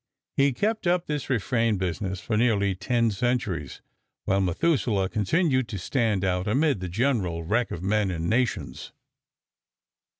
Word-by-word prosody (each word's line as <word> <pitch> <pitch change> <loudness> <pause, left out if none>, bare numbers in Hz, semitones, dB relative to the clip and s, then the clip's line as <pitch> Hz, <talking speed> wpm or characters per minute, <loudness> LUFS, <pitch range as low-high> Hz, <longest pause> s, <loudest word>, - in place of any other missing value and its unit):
He 140 0 +4
kept 210 - -1
up 175 0 +2
this 150 -3 -3
refrain 115 -2 +1
business 95 +1 -3
for 105 +4 -2
nearly 105 -4 +2
ten 115 +4 0
centuries, 100 - -2 0.4
while 100 0 +2
Methuselah 100 - +1
continued 130 - +1
to 105 - -5
stand 105 -1 0
out 90 0 0
amid 135 +2 +2
the 90 -1 -5
general 95 -6 0
wreck 115 +8 0
of 85 - -6
men 105 0 +1
and 85 -2 -3
nations. 120 +2 -1
110 Hz, 140 wpm, -26 LUFS, 95-130 Hz, 0.4 s, He